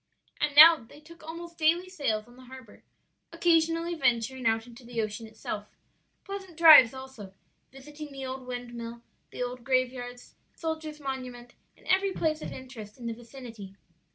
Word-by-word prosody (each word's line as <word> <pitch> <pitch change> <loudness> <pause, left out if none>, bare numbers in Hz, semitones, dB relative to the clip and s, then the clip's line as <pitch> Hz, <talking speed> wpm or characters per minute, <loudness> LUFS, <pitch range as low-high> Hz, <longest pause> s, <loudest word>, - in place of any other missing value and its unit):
And 295 -1 0
now 325 +2 +11
they 260 +3 -16
took 335 +3 -16
almost 335 +1 -9
daily 335 +3 +2
sails 235 - -2
on 240 - -17
the 255 0 -15
harbor, 255 -3 -13 0.5
occasionally 330 0 +2
venturing 250 -4 0
out 225 0 +1
into 245 +1 -14
the 240 -1 -6
ocean 215 +1 -3
itself; 215 -1 -6 0.6
pleasant 390 -4 -8
drives 305 -8 +9
also; 260 -8 -10 0.4
visiting 295 +3 -10
the 270 -1 -7
old 260 0 -6
windmill, 240 -1 -7 0.3
the - - -4
old 245 0 -6
graveyards, 250 -1 -2 0.2
the - - -40
soldiers' 315 -2 -4
monument, 255 -3 -6 0.2
and - - -22
every 385 +1 +2
place 310 -3 -1
of - - -6
interest 250 -5 -10
in 245 - -10
the 230 - -2
vicinity. 230 -4 -11
260 Hz, 160 wpm, -28 LUFS, 235-315 Hz, 0.6 s, now